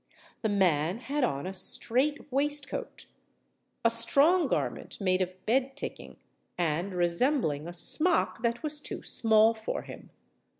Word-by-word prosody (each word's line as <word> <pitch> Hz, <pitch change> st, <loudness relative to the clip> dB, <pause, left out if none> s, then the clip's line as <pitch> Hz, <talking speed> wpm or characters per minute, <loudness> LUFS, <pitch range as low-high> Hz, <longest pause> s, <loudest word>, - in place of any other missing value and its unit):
The 220 Hz, -, 0 dB
man 180 Hz, -3 st, +2 dB
had 275 Hz, +3 st, -2 dB
on 140 Hz, -, -1 dB
a 190 Hz, -, -4 dB
strait 260 Hz, +10 st, 0 dB
waistcoat,—a 280 Hz, -4 st, -3 dB
strong 285 Hz, +10 st, +4 dB
garment -, -, -3 dB
made 185 Hz, -2 st, +1 dB
of 185 Hz, 0 st, -4 dB
bed 265 Hz, +3 st, +1 dB
ticking, -, -, -7 dB, 0.4 s
and 175 Hz, +3 st, -1 dB
resembling 175 Hz, -, +1 dB
a 175 Hz, -, -7 dB
smock 315 Hz, -, 0 dB
that 235 Hz, +2 st, -1 dB
was 300 Hz, -1 st, -2 dB
too -, -, -7 dB
small 220 Hz, 0 st, +4 dB
for 220 Hz, -1 st, -5 dB
him. -, -, -11 dB
225 Hz, 130 wpm, -29 LUFS, 185-280 Hz, 0.4 s, strong